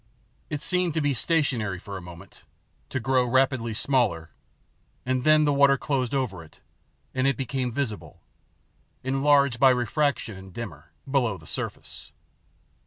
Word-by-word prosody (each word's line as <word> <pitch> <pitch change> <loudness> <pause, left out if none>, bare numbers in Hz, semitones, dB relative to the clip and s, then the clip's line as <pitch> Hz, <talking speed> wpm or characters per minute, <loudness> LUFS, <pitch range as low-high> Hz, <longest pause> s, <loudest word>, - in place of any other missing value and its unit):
It 150 -1 -3
seemed 180 -3 +1
to - - +2
be 145 -1 +1
stationary 125 - 0
for 100 +2 -9
a 95 - -6
moment, 85 -1 -13 0.5
to 130 - -2
grow 130 +1 +2
rapidly 125 -2 +1
smaller, 95 - 0 0.7
and 130 0 0
then 155 +1 +5
the 145 - +2
water 140 0 +5
closed 130 -2 -1
over 105 -11 -2
it, 80 - -19 0.5
and 130 +1 +1
it 135 -4 +1
became 130 -1 -2
visible, 110 -8 -4 0.8
enlarged 135 -1 +3
by 135 - +7
refraction 125 -1 0
and 95 0 -12
dimmer, 80 -9 -8 0.2
below 125 -7 +1
the 80 - -16
surface. - - -5
130 Hz, 145 wpm, -26 LUFS, 105-140 Hz, 0.8 s, by